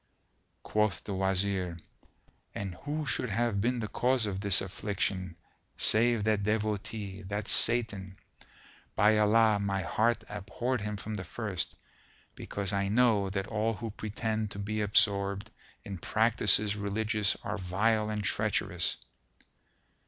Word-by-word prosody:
Quoth 105 -4 0
the 100 - -5
Wazir, 95 -2 0 0.8
"And 100 -2 -4
who 145 - -4
should 125 -2 -1
have 110 -1 0
been 120 +2 0
the 110 - -2
cause 125 +1 +1
of 100 -2 -3
this 100 -1 +5
affliction, 95 -2 -3 0.4
save 115 0 +3
that 110 -1 +2
Devotee, 105 -1 -2
that 105 +1 -3
Satan? 100 -5 +3 0.8
By 105 0 +4
Allah, 105 0 +4
my 100 -1 -1
heart 115 +2 +1
abhorred 110 +4 -3
him 105 0 -3
from 110 +2 -6
the 100 -3 -3
first, 95 -2 -4 0.6
because 100 0 -3
I 100 0 +1
know 105 -2 +3
that 95 0 -2
all 110 +1 -1
who 110 +2 -5
pretend 110 0 -3
to 100 - -8
be 105 +2 -2
absorbed 100 -1 +1 0.3
in 95 -3 -7
practices 105 -1 +3
religious 105 0 0
are 105 - -3
vile 105 +4 +1
and 105 -1 -2
treacherous!" 100 -4 0
105 Hz, 130 wpm, -30 LUFS, 100-110 Hz, 0.8 s, this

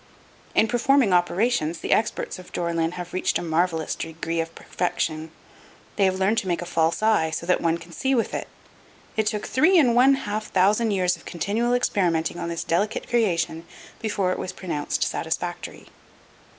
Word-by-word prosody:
In 220 - +4
performing 245 -2 +3
operations, 175 -1 +1
the - - -4
experts 215 - 0
of 180 - -13
Dore 170 -1 -2
lyn 165 0 0
have 180 0 -7
reached 185 - +1
a - - -5
marvelous 165 -1 0
degree 165 +1 -4
of 165 0 -7
perfection. 160 -3 -2 0.7
They 200 - +3
have 185 0 +1
learned 200 +4 +2
to 195 - -6
make 175 -1 -1
a - - -7
false 165 +3 0
eye 215 -8 +3
so 160 - -4
that 180 - +2
one 165 0 +1
can 170 +1 -13
see 265 +9 0
with 230 - 0
it. - - -3 0.7
It 220 -1 +1
took 210 -1 -1
three 330 +8 +4
and 255 -8 +5
one 260 +3 +6
half 215 -4 -4
thousand 205 +5 +3
years 185 -3 +1
of - - -18
continual 225 +8 0
experimenting 175 -8 0
on 170 -1 -3
this 170 -1 -3
delicate 205 +7 -1
creation 175 -8 +1 0.4
before 200 -4 0
it - - -2
was 185 - -4
pronounced 160 -6 -2
satisfactory. - - -4
185 Hz, 180 wpm, -24 LUFS, 170-220 Hz, 0.7 s, one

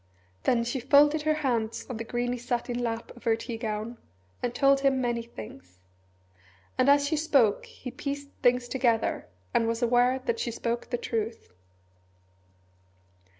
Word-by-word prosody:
Then 235 -1 +3
she 240 +3 -2
folded 295 +4 +5
her 310 0 +2
hands 230 -3 -1
on 245 - -5
the 230 - -4
greeny 245 +1 -2
satin 245 0 -2
lap 230 -1 -3
of 240 - -15
her 225 -1 +4
tea 230 +1 -6
gown, 220 +1 -4 0.4
and 245 - -1
told 275 -1 +4
him 275 -1 +2
many 240 -2 0
things. 90 - -11 1.0
And 255 +1 +3
as 285 0 +5
she 315 - +1
spoke 285 -9 +2
he 250 - -9
pieced 280 +1 -5
things 245 -1 +3
together, 240 - 0 0.3
and 230 - +3
was 230 +1 -1
aware 245 +2 +4
that 460 - -2
she 250 - -1
spoke 235 +1 -3
the 245 - -1
truth. 225 - -4
245 Hz, 155 wpm, -28 LUFS, 230-270 Hz, 1.0 s, folded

